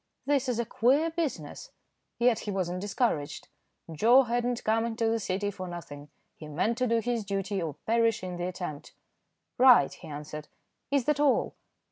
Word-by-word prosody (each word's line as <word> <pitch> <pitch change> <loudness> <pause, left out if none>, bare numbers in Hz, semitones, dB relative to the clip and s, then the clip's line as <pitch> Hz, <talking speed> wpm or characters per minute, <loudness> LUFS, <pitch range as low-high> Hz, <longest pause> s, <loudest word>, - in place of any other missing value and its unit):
"This 275 -2 +1
is 245 - 0
a 235 - 0
queer 275 +9 +2
business." 335 - -4 0.5
Yet 240 -1 +3
he - - -6
was 185 -3 -1
not 180 - -3
discouraged. 195 - -2 0.4
Joe 235 - +5
had 240 0 -1
not 245 0 -2
come 225 +1 +2
into 230 0 -1
the 225 0 +1
City 200 0 -2
for 185 -2 -7
nothing. 150 -4 -8 0.3
He 155 - -10
meant 195 - -1
to 255 - +2
do 230 0 +2
his 235 -1 -1
duty 195 -1 -2
or 155 -4 -4
perish 230 -2 +2
in 180 -1 -5
the 175 - -3
attempt. 175 -5 -6 0.7
"Right," 250 - +7
he - - -12
answered. 150 0 -7 0.4
"Is 280 -3 +1
that 300 -1 +1
all?" 290 -2 +2
225 Hz, 180 wpm, -28 LUFS, 180-245 Hz, 0.7 s, Right